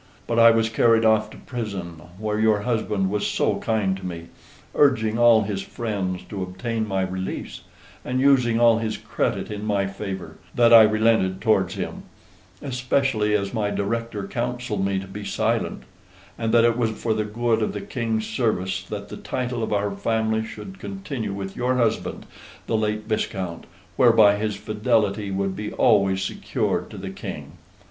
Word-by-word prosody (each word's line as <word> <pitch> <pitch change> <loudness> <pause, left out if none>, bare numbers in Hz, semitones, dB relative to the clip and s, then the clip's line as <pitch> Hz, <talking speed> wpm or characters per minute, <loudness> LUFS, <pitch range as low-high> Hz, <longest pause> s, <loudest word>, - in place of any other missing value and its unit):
But 115 0 0
I 115 0 +9
was 115 -1 +3
carried 115 0 +3
off 110 -1 +3
to - - -13
prison, 95 -9 -6 0.2
where 105 +1 -2
your 110 -1 +3
husband 105 -4 -1
was 105 0 0
so - - 0
kind 105 -4 0
to 95 - -12
me 85 -2 -6 0.4
urging 115 -6 +3
all 115 -2 +6
his 100 -1 -3
friends 95 -5 -3
to 100 -2 -5
obtain 110 +5 -3
my 95 -1 0
release, 95 0 -5 0.4
and 125 +1 -2
using 125 -4 +4
all 115 -1 +5
his 110 -1 -2
credit - - -2
in 105 0 -5
my 100 -2 +1
favor 95 -1 -6 0.2
that 120 -1 +5
I 115 - +11
relented 110 -3 +3
towards 95 -5 +2
him, - - -5 0.6
especially 125 -5 +1
as 100 -1 -1
my 105 -2 0
director 105 0 -3
counselled 120 -4 -2
me 100 0 0
to 95 - -4
be 100 +2 -8
silent; - - -1 0.5
and 115 -1 -2
that 115 - +5
it 120 0 +2
was 115 -2 +2
for 110 +1 -2
the 110 0 0
good 115 +1 0
of 110 - 0
the 105 - -4
King's 110 -2 -2
service 100 -5 -1
that 100 0 -6
the - - -7
title 125 -2 -3
of 110 - -2
our 105 0 0
family 110 +2 0
should 190 - -9
continue 140 - -5
with 95 -1 -5
your 125 +1 0
husband 115 -3 -1 0.4
the - - -1
late 105 0 0
viscount, 95 -5 -3 0.3
whereby 105 -2 +6
his 105 -1 -2
fidelity 105 0 0
would 95 0 -1
be 105 0 -5
always 95 -2 +3
secured - - -2
to - - -10
the - - -6
King. - - -7
110 Hz, 170 wpm, -23 LUFS, 100-115 Hz, 0.6 s, I